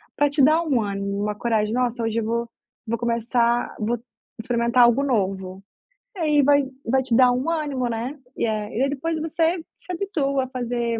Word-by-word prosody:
para 290 0 +3
te 285 +1 +1
dar 310 +4 +5
um 275 -8 +1
ânimo, 200 -1 -3
uma 210 0 -1
coragem, 220 -2 0
"nossa 245 -1 0
hoje 225 0 0
eu 225 - -2
vou 235 +1 -2 0.4
vou 230 +1 -1
começar 235 +1 0
vou 230 +2 0 0.4
experimentar 235 +1 +2
algo 240 +4 +4
novo", 190 -6 -1 0.5
e - - -9
aí 300 -3 +3
vai 285 +1 +5 0.2
vai 265 +2 +2
te 245 -2 0
dar 250 0 +6
um 255 +6 -1
ânimo, 290 -6 -1
né. 235 +6 -4 0.2
E - - +1
a 215 -1 -2
e 240 - -1
aí 275 - +1
depois 315 +4 -2
você 325 +2 0 0.2
se - - -9
habitua 285 -8 -1
a - - -9
fazer 240 -2 -2
245 Hz, 195 wpm, -23 LUFS, 225-280 Hz, 0.5 s, dar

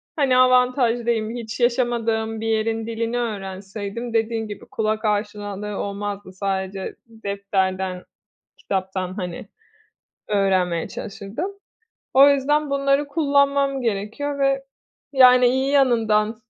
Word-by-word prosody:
hani, 275 -5 +3
avantajlıyım. 245 -3 +3
Hiç 230 -1 -6
yaşamadığım 230 -2 0
bir 225 - -2
yerin 225 0 0
dilini 230 +1 -2
öğrenseydim 205 +1 -5
dediğin 225 0 0
gibi 205 -1 -8
kulak 215 0 -2
aşinalığı 205 -1 -2
olmazdı. 200 -1 -4
Sadece 190 0 -3
defterden, 190 -4 -2 0.6
kitaptan, 190 -1 -3
hani, 180 -1 -5 0.8
öğrenmeye 185 -5 +1
çalışırdım. 220 - -6 0.6
O 275 +2 +8
yüzden 290 +2 +2
bunları 275 +1 +1
kullanmam 280 -2 +2
gerekiyor 230 +6 -2
ve, 275 0 +2 0.5
yani, 250 -2 +7
iyi 265 +2 +1
yanından, 225 -5 +3
225 Hz, 100 wpm, -22 LUFS, 200-255 Hz, 0.8 s, O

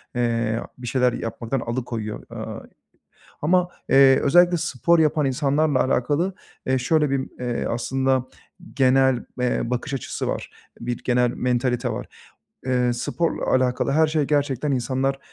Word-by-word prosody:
eee, 115 -2 0 0.2
bir 125 -1 -8
şeyler 125 -1 +2
yapmaktan 115 +3 -3
alıkoyuyor, 115 -3 -4
ııı, - - -7 0.7
ama, 180 +3 +2 0.2
eee, 135 -1 +6
özellikle 175 +4 +4
spor 165 +3 +1
yapan 155 -1 +2
insanlarla 140 +1 +1
alakalı, 145 +9 0 0.3
eee, 130 0 +1
şöyle 150 +3 +2
bir, 135 -1 -1
eee, 125 -1 -2
aslında 130 +2 0 0.5
genel, 130 -2 +3
eee, 125 0 +1
bakış 125 +3 -3
açısı 130 - -4
var. - - -3 0.3
Bir 120 0 -3
genel 125 -1 +2
mantalite 125 0 0
var. 120 +2 -4 0.6
Eee, 125 -2 +1
sporla 165 +7 -2
alakalı 130 +1 +1
her 155 +2 +4
şey 155 -1 +1
gerçekten 145 -1 0
insanlar, 130 +2 -1
130 Hz, 135 wpm, -23 LUFS, 125-145 Hz, 0.7 s, eee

